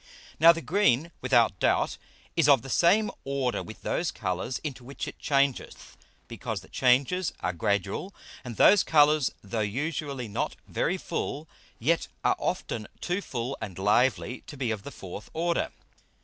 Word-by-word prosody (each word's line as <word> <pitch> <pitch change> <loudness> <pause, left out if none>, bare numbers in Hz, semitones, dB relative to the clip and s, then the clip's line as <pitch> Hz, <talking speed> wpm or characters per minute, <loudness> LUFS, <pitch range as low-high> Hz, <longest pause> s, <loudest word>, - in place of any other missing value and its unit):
Now 165 +2 +9
the 165 0 -4
green, 170 - +2
without - - +3
doubt, - - +1 0.4
is 150 - +4
of 135 -4 +6
the 135 - -7
same 205 +5 +4
Order 135 -3 -1
with 110 - -10
those 170 - 0
Colours 95 +5 -3
into 135 -5 -5
which 135 +3 -6
it - - -8
changeth, 140 -2 -1 0.3
because - - -5
the - - -17
Changes 140 +8 +2
are 90 - -1
gradual, 100 - -1 0.3
and 120 -3 -7
those 205 -2 +7
Colours, 150 -2 +4
though 105 +3 -3
usually 135 +3 -2
not 100 - -2
very - - 0
full, 150 +3 -4 0.3
yet 165 +8 +1 0.2
are - - +3
often 110 -3 -3
too 180 +3 -1
full 125 -4 -4
and 95 -5 -6
lively 115 +5 +2
to 145 - -9
be 125 -4 -1
of 110 -2 -3
the - - -8
fourth 95 +2 -9
Order. 170 +1 0
135 Hz, 160 wpm, -27 LUFS, 110-160 Hz, 0.4 s, Now